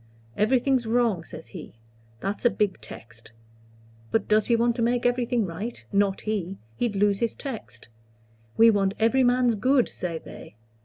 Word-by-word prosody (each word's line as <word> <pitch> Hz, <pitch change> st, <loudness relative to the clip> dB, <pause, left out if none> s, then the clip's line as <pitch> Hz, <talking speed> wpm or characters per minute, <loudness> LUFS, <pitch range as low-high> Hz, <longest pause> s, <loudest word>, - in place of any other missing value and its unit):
'Everything's 250 Hz, +2 st, +2 dB
wrong,' 225 Hz, -7 st, +1 dB
says 160 Hz, 0 st, -11 dB
he. 165 Hz, -, -10 dB, 0.5 s
That's 200 Hz, +1 st, -3 dB
a 240 Hz, -, +5 dB
big 205 Hz, -, -1 dB
text. 115 Hz, +1 st, -12 dB, 0.8 s
But 225 Hz, -, 0 dB
does 215 Hz, 0 st, +3 dB
he 235 Hz, -, +3 dB
want 235 Hz, 0 st, +2 dB
to -, -, -1 dB
make 240 Hz, +1 st, +1 dB
everything 245 Hz, -2 st, +1 dB
right? 195 Hz, +7 st, -6 dB
Not 200 Hz, -1 st, +1 dB
he. 195 Hz, -3 st, -3 dB, 0.2 s
He'd 235 Hz, -4 st, -1 dB
lose 200 Hz, 0 st, +2 dB
his 235 Hz, -2 st, -1 dB
text. 225 Hz, -, -8 dB, 0.7 s
'We 230 Hz, 0 st, +7 dB
want 195 Hz, -2 st, +1 dB
every 230 Hz, +4 st, +3 dB
man's 245 Hz, -1 st, +3 dB
good,' 255 Hz, +4 st, +2 dB
say 170 Hz, -2 st, -4 dB
they. 135 Hz, -, -12 dB
220 Hz, 160 wpm, -25 LUFS, 195-240 Hz, 0.8 s, We